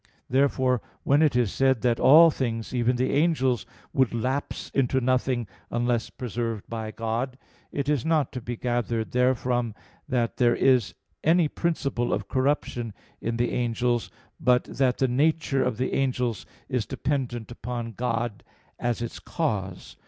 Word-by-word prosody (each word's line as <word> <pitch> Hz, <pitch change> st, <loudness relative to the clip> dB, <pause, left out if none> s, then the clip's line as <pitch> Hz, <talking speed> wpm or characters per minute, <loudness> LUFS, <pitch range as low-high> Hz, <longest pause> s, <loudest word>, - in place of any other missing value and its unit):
Therefore, 130 Hz, -2 st, +2 dB, 0.2 s
when 140 Hz, +2 st, +4 dB
it 150 Hz, -5 st, +3 dB
is 120 Hz, -5 st, +2 dB
said 130 Hz, -3 st, +2 dB
that 120 Hz, -2 st, +2 dB
all 160 Hz, +5 st, +8 dB
things, 115 Hz, -5 st, -3 dB
even 125 Hz, 0 st, +2 dB
the 125 Hz, +1 st, 0 dB
angels, 135 Hz, -, +2 dB, 0.3 s
would 130 Hz, -3 st, +2 dB
lapse 130 Hz, +5 st, -2 dB
into 130 Hz, -1 st, +2 dB
nothing, 125 Hz, -2 st, +1 dB, 0.2 s
unless 120 Hz, 0 st, 0 dB
preserved 115 Hz, -3 st, -4 dB
by 110 Hz, -1 st, -4 dB
God, 115 Hz, +4 st, -3 dB, 0.3 s
it 140 Hz, -1 st, -2 dB
is 145 Hz, -5 st, +1 dB
not 160 Hz, -3 st, +1 dB
to 125 Hz, -, -5 dB
be 120 Hz, +1 st, -5 dB
gathered 120 Hz, -2 st, -1 dB
therefrom 125 Hz, -2 st, +1 dB, 0.3 s
that 120 Hz, -2 st, 0 dB
there 120 Hz, -1 st, +4 dB
is 125 Hz, -8 st, +3 dB, 0.3 s
any 165 Hz, +1 st, +4 dB
principle 145 Hz, -7 st, -1 dB
of -, -, -2 dB
corruption 130 Hz, -5 st, -1 dB, 0.3 s
in 115 Hz, 0 st, -2 dB
the 120 Hz, 0 st, +1 dB
angels; 120 Hz, 0 st, 0 dB, 0.3 s
but 125 Hz, 0 st, +3 dB
that 130 Hz, -2 st, 0 dB
the 130 Hz, -, +2 dB
nature 140 Hz, +1 st, +2 dB
of 110 Hz, -, -1 dB
the 130 Hz, +2 st, -1 dB
angels 125 Hz, -4 st, -1 dB, 0.2 s
is 125 Hz, -5 st, -1 dB
dependent 125 Hz, -5 st, -2 dB
upon 120 Hz, -1 st, -5 dB
God 115 Hz, -1 st, -2 dB, 0.4 s
as 120 Hz, -1 st, -1 dB
its 120 Hz, -, -6 dB
cause. 100 Hz, -, -3 dB
125 Hz, 150 wpm, -26 LUFS, 120-135 Hz, 0.4 s, all